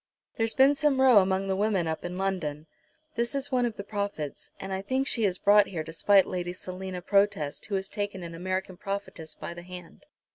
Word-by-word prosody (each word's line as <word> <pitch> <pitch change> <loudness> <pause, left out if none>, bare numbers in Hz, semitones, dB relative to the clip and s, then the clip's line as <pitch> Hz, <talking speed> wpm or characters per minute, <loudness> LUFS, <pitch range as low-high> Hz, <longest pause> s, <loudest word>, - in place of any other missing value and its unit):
There's 225 0 0
been 270 +2 +6
some 290 -2 +1
row 255 -5 +7
among 190 0 +1
the 190 - +1
women 200 -3 +1
up 160 0 -3
in 180 +1 -4
London. 175 -6 -2 0.5
This 235 0 -2
is 275 +1 -3
one 250 -2 +2
of 225 - -6
the 200 - -5
prophets, 200 -8 -4
and 195 0 -5
I 190 - -2
think 260 +7 0
she 230 -5 +1
is 185 -2 +1
brought 205 +1 +5
here 165 -5 -4
to 160 +1 -9
spite 195 +3 +5
Lady 175 -1 -3
Selina 185 0 -6
Protest 195 -8 +1
who 205 - -2
has 190 0 -1
taken 205 -2 -4
an 170 -1 -7
American 185 +1 -3
prophetess 195 -5 -5
by - - -6
the 175 - -9
hand. 180 +9 -11
195 Hz, 215 wpm, -28 LUFS, 180-210 Hz, 0.5 s, row